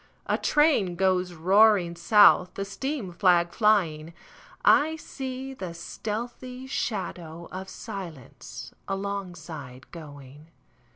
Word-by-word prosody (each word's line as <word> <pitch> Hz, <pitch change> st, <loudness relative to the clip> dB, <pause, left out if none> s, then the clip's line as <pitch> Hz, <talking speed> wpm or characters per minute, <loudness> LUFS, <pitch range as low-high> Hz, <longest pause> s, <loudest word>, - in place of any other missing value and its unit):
A -, -, +1 dB
train 295 Hz, -, +2 dB
goes 185 Hz, -1 st, +1 dB
roaring 185 Hz, +1 st, +4 dB
south, 185 Hz, +1 st, +5 dB
The 195 Hz, -, -3 dB
steam 245 Hz, 0 st, -4 dB
flag 175 Hz, -1 st, +3 dB
flying;I 195 Hz, -, +1 dB
see 265 Hz, -3 st, -6 dB
the 185 Hz, -9 st, -7 dB
stealthy 240 Hz, +8 st, -6 dB
shadow 175 Hz, -9 st, -4 dB
of 190 Hz, +1 st, -6 dB
silenceAlongside 185 Hz, -, -7 dB
going. 145 Hz, -2 st, -12 dB
190 Hz, 90 wpm, -26 LUFS, 170-220 Hz, -, south